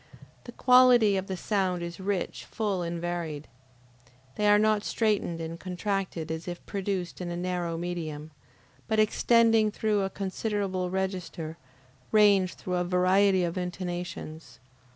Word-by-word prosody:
The 240 - -8
quality 250 -4 +5
of 190 0 -2
the 190 - -4
sounds 185 -3 -1
is 170 +1 -6
rich, 190 -1 -3
full, 205 -5 -2
and 170 0 -3
varied. 165 -4 -4 0.9
They 210 - +1
are 205 0 +6
not 215 0 +2
straitened 210 -7 0
and 165 +1 -6
contracted 185 -3 -3
as 160 +2 -5
if 175 -1 -6
produced 190 -3 -3
in 175 - -4
a 175 - -4
narrow 175 -2 -2
medium, 160 -3 -5 0.6
but 220 - 0
extending 225 0 +4
through 210 -1 0
a 195 - -1
considerable 195 -1 -2
register, 185 -4 -3 0.6
range 200 -4 +4
through 180 -1 -3
a 180 - +1
variety 185 +1 +3
of 175 +1 -2
intonations. 175 -3 -6
185 Hz, 140 wpm, -28 LUFS, 175-205 Hz, 0.9 s, are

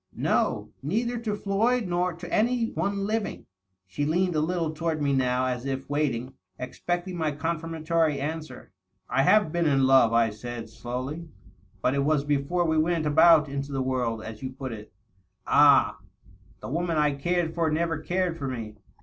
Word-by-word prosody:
" - - -52 0.2
No - - +1
— - - -40
neither 230 - -1
to 220 -3 -2
Floyd 215 +4 +1
nor 180 +1 0
to 175 +1 -9
any 230 +1 +1
one 200 0 -1
living." 215 0 -3 0.4
She 95 +10 -4
leaned 175 +4 +1
a - - +2
little 165 0 -1
toward 160 0 -2
me, 140 -1 +1
now, 130 -1 +1
as 125 -1 -2
if 135 0 -3
waiting, 135 -4 -1 0.2
expecting 175 +8 -4
my 160 -3 -1
confirmatory 160 0 -1
answer. 150 -2 -6 0.2
" 95 - -48
I 135 - +3
have 185 +3 +4
been 170 -1 +1
in 135 -2 +3
love," 130 -3 +5
I 115 -1 +3
said 115 +1 -7
slowly, 130 +8 -5 0.2
" - - -33
but 125 - +2
it 140 0 +1
was 150 -1 +2
before 150 +5 0
we 160 -1 +2
went 165 0 +1
about 155 +1 +6
into 140 0 -4
the 135 -1 -1
world, 125 -4 -1
as 110 -1 -8
you 130 - -4
put 130 0 -6
it." 110 -1 -9 0.5
"Ah!" - - +5 0.3
" - - -27
The - - -6
woman 165 +2 -1
I 150 -1 +3
cared 170 +3 -1
for 165 -1 +1
never 165 0 0
cared 175 +1 -1
for 140 - -3
me. 115 -5 -6
155 Hz, 190 wpm, -26 LUFS, 130-175 Hz, 0.5 s, about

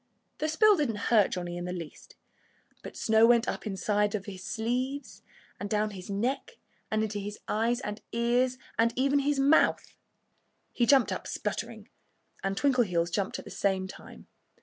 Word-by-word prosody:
The 310 - 0
spill 420 +5 +5
didn't 275 -8 0 0.2
hurt 210 -4 +6
Johnnie 175 -1 -4
in 175 - -4
the 180 - -4
least. 170 -4 -8 0.7
But - - -9
snow 220 +1 +4
went 240 0 +4
up - - -2
the - - -2
inside 205 +1 0
of 200 -2 -4
his 190 -2 -8
sleeves, 250 +6 -3 0.4
and 205 - -4
down 210 0 0
his 185 -1 -9
neck, 250 - -2 0.3
and 215 0 +1
into 210 -1 -3
his 205 +1 -6
eyes 230 +3 +1
and 210 -5 -5
ears 245 +2 +1 0.2
and 230 0 +3
even 275 +2 +2
his 285 +1 +1
mouth. 280 +4 +3 0.8
He 240 - +1
jumped 270 -2 +5
up - - -4
spluttering. - - -4 0.6
And 195 0 -1
Twinkleheels 200 -12 +2
jumped 195 +1 -1
at - - -9
the - - -10
same 190 -1 0
time. 190 - -12
220 Hz, 170 wpm, -29 LUFS, 200-255 Hz, 0.8 s, hurt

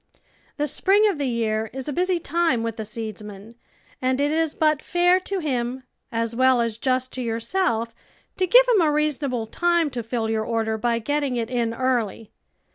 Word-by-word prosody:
The 295 - 0
spring 395 +8 +3
of 325 - -7
the 280 - 0
year 220 -2 -1
is 265 +1 -5
a 295 - -2
busy 365 +3 +1
time 335 -7 0
with 230 0 -3
the 220 - -4
seedsman, 215 -1 -7 0.5
and 255 +1 +1
it 290 +1 +1
is 320 -1 0
but 305 -2 +2
fair 355 +1 +3
to 390 +1 -4
him, 255 -3 -2 0.3
as 230 0 -2
well 260 0 +4
as 230 -1 -1
just 255 0 0
to 255 - -4
yourself, 230 +1 -1 0.4
to 370 - +1
give - - +7
hiin 425 -10 +3
a - - +2
reasonable 290 -5 0
time 340 +5 +1
to 245 -1 -3
fill 230 0 -2
your 220 0 0
order 220 -1 -1
by 235 +1 +1
getting 285 +2 -1
it 235 0 -3
in 235 -2 -1
early. 230 -4 -1
255 Hz, 190 wpm, -23 LUFS, 230-305 Hz, 0.5 s, give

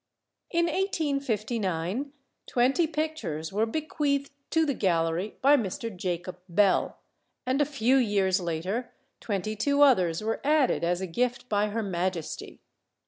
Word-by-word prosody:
In 340 -1 +2
1859, 255 - -1 0.4
twenty 265 +7 +2
pictures 300 - -3
were 215 +3 +1
bequeathed 285 0 -1 0.2
to 325 -1 +3
the 285 - 0
gallery 175 -1 0
by 280 +2 +7
Mr. 225 -2 -3
Jacob 180 0 -4
Bell, 195 +2 +2 0.5
and 260 +3 +1
a - - +4
few 265 -2 +2
years 200 -6 +2
later 180 +8 -3 0.2
twenty 210 0 -2
two 285 +6 +3
others 185 - +3
were 225 +1 -2
added 295 - +2
as 175 +2 +1
a - - -1
gift 245 +7 -1
by 210 0 +2
Her 220 +2 -2
Majesty. 180 -3 -3
220 Hz, 135 wpm, -27 LUFS, 185-280 Hz, 0.5 s, by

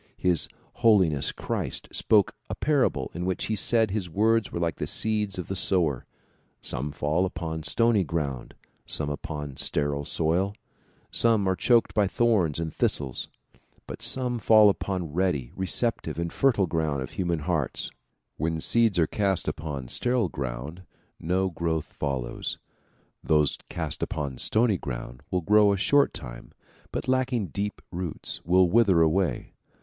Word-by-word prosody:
His 90 -3 +2 0.3
Holiness 95 - +4
Christ - - -4
spoke 105 -4 +3 0.2
a - - -3
parable 135 - +1
in 85 - -4
which 95 0 -1
he 110 - -1
said 110 +1 +2
his 95 -4 -2
words 110 +5 +2
were - - -3
like 85 -1 -1
the - - -3
seeds 105 -3 +1
of 90 - -5
the 95 - -3
sower; 85 -8 +2 0.5
some 75 +3 -3
fall 75 +5 0
upon 80 -3 -3
stony 105 +7 +2
ground, 70 -6 -4 0.3
some 75 -1 -2
upon 75 -2 -6
sterile 70 +1 0
soil, 90 +8 0 0.6
some 110 -4 +2
are 95 - +2
choked 120 +4 +3
by 105 -2 +3
thorns 100 -8 +2
and 80 -1 -3
thistles 70 -4 -1 0.6
but - - -8
some 125 -2 0
fall 110 -1 +6
upon 90 -6 -4
ready, 75 -9 0
recep 100 +5 0
tive - - -6
and 85 0 -3
fertile 120 -8 +3
ground 80 -5 -1
of 65 - -8
human 85 -2 -1
hearts. 75 - -2 0.5
When 80 +1 -1
seeds 115 +2 +3
are 85 - +4
cast 95 +2 -1
upon 70 -4 -4
sterile 120 - 0
soil 65 +4 -4 0.4
no 95 +3 0
growth 80 -2 -2
follows. 65 -4 -3 0.7
Those 75 -2 +3
cast - - -4
upon 70 -5 -3
stony 110 -4 +2
ground - - -6
will 90 - 0
grow 105 +3 +5
a 100 - +1
short 140 +8 +3
time - - -9 0.4
but - - -4
lacking 130 -5 0
deep 105 +1 -4
roots 90 -2 -5
will 90 +2 +4
wither 95 -4 +4
away. 85 +3 0
90 Hz, 150 wpm, -26 LUFS, 75-105 Hz, 0.7 s, fall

